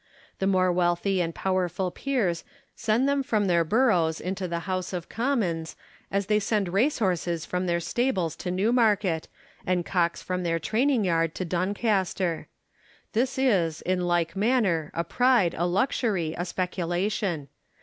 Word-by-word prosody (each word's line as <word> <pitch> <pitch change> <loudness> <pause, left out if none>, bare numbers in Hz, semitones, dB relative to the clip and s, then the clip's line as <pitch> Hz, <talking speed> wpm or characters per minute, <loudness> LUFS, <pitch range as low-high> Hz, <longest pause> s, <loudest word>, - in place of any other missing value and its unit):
The 195 - +1
more 185 -2 +3
wealthy 180 +2 +1
and 165 -1 -2
powerful 185 -1 -1
peers 210 -12 -1 0.3
send 230 +4 +1
them 280 0 +2
from 220 -7 0
their 170 -3 +3
boroughs 175 -5 +2
into 185 0 -3
the 170 -1 -3
House 185 +1 -3
of 175 -2 -5
Commons, 210 -11 -1 0.3
as 200 0 0
they 210 +2 +2
send 205 -2 0
race 250 +10 +2
horses 175 -5 -1
from 180 0 -2
their 170 0 +1
stables 185 - -1
to 180 - -4
Newmarket, 205 -3 +2 0.4
and 180 -2 0
cocks 170 -2 0
from 185 0 -2
their 165 -1 0
training 225 - +1
yard 165 -2 +1
to 185 - -3
Don 185 +4 -1
caster. 190 -6 0 0.7
This 250 +4 0
is, 190 -12 +1
in 180 -1 0
like 170 -1 +1
manner, 195 -8 +1
a 170 - 0
pride, 235 -2 +3
a 175 - 0
luxury, 190 - 0
a 175 - -3
specu 180 0 -3
lation. 175 -4 -1
185 Hz, 160 wpm, -26 LUFS, 170-215 Hz, 0.7 s, more